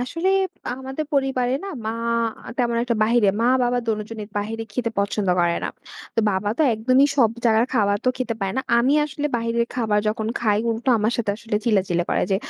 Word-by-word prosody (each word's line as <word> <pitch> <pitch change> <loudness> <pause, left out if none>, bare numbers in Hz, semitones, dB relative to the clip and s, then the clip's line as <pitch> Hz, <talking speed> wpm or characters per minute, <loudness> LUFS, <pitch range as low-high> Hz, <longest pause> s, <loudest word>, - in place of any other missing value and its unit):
আসলে 330 +9 -2 0.5
আমাদের 265 +4 -5
পরিবারে 265 -2 +1
না - - -5 0.2
মা 220 - 0 0.7
তেমন 235 -2 +1
একটা 240 - 0
বাহিরে 225 -2 +3
মা-বাবা 245 0 +2
দোনোজনের 215 0 -3
বাইরে 225 +2 -3
খেতে 230 0 -1
পছন্দ 200 -1 0
করে 170 0 +2
না। - - -1 0.5
তো 225 - +2
বাবা 190 +1 -1
তো 315 - +4
একদমই 255 +5 +4
সব 235 -5 +4
জায়গার 225 +1 +4
খাবার 205 -3 +3
তো - - +3
খেতে 245 -3 -2
পারে 195 -1 -1
না। 265 - 0 0.2
আমি 255 +4 +3
আসলে 295 0 -3
বাইরের 235 0 0
খাবার 220 -4 +1
যখন 220 0 -2
খাই; 210 -3 +2
উল্টো 230 +3 -3
আমার 220 +3 +1
সাথে 225 -4 0
আসলে 225 -1 -3
চিল্লাচিল্লি 185 -6 +1
করে - - +1
যে, 190 - +3
230 Hz, 185 wpm, -22 LUFS, 210-250 Hz, 0.7 s, তো